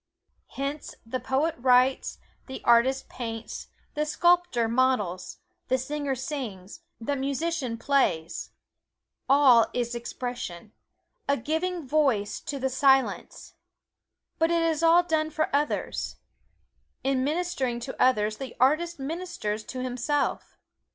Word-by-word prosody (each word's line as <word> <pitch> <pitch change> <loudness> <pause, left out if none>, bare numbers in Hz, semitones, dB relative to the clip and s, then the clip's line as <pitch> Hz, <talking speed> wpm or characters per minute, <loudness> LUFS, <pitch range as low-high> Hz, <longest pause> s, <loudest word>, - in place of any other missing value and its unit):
Hence 280 +2 -4
the 255 +3 -3
poet 275 +6 0
writes, 255 +1 +3 0.3
the 265 - -7
artist 260 +3 +4
paints, 225 -2 -6 0.3
the 300 - 0
sculptor 345 -6 +2
models, 225 -7 0 0.3
the 260 - +2
singer 285 +1 -2
sings, 240 -8 -6 0.2
the 260 +5 -2
musician 275 -2 -2
plays 230 - 0 0.8
all 265 -4 +6
is 240 -1 -1
expression 235 -5 -5 0.6
a 280 - +3
giving 320 +4 -2
voice 255 -8 +1
to 290 - -5
the 265 0 0
Silence. 265 0 +1 0.9
But 325 0 +3
it 335 -1 +2
is 325 -1 +1
all 335 +1 +6
done 315 -2 0
for 310 -2 -1
others. 295 +1 -1 0.9
In 265 -1 +1
ministering 285 -6 -1
to 260 +2 -6
others 215 -4 +3
the 265 -3 -7
artist 310 +7 +2
ministers 280 -8 -4
to 255 0 -5
himself. 255 +3 -2
265 Hz, 115 wpm, -27 LUFS, 240-305 Hz, 0.9 s, all